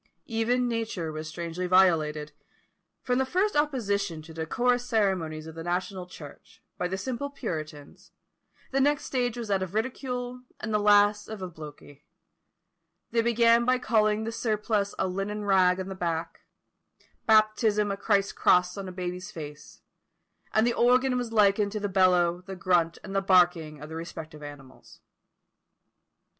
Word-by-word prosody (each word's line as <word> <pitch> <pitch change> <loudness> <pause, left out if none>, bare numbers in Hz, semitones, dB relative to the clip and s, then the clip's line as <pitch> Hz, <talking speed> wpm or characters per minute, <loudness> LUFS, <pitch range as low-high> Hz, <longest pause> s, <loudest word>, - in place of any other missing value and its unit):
Even 240 +2 0
nature 225 -8 -3
was 155 0 -6
strangely 170 +3 -4
violated! 155 -5 +3 0.7
From 250 0 +1
the - - +3
first 370 +10 0
opposition 205 - 0
to 160 +1 -12
the 160 0 -4
decorous 245 +5 +1
ceremonies 190 -10 0
of 160 - -9
the 165 0 -7
national 180 +1 -3
church, 150 -5 -13
by 180 - -2
the 190 +2 -3
simple 255 +7 -4
puritans, 155 - -7 0.6
the 270 0 +1
next 290 +1 +2
stage 245 -2 -1
was 230 -3 -5
that 195 -1 +1
of 185 +1 -5
ridicule, 250 +1 -3 0.2
and 215 0 -4
the 210 - +3
last 205 0 +4
of 215 -3 -7
obloquy. 150 -4 -10 1.1
They 230 - +2
began 235 0 +4
by 255 +1 +3
calling 215 -3 +1
the 225 - -3
surplice 215 -3 -1
a - - 0
linen 200 +3 -3
rag 185 -2 +4
on 190 - -4
the 195 - -5
back; 170 -3 -4 0.8
baptism 215 -1 +3
a - - -1
Christ's 200 -1 +1
cross 180 +1 +3
on 195 - -6
a - - -6
baby's 180 0 -5
face; 150 -2 -10 0.7
and 220 +1 +3
the 240 - +2
organ 250 +2 +3
was 245 -2 -2
likened 205 -1 +3
to 215 - -2
the 205 - -2
bellow, 180 -2 +3
the 190 - -6
grunt, 170 -2 +1
and 195 - -7
the 195 - +2
barking 175 -5 +3
of 150 - -9
the 160 - -8
respective 160 -2 -8
animals. 145 -3 -12
195 Hz, 160 wpm, -27 LUFS, 170-225 Hz, 1.1 s, last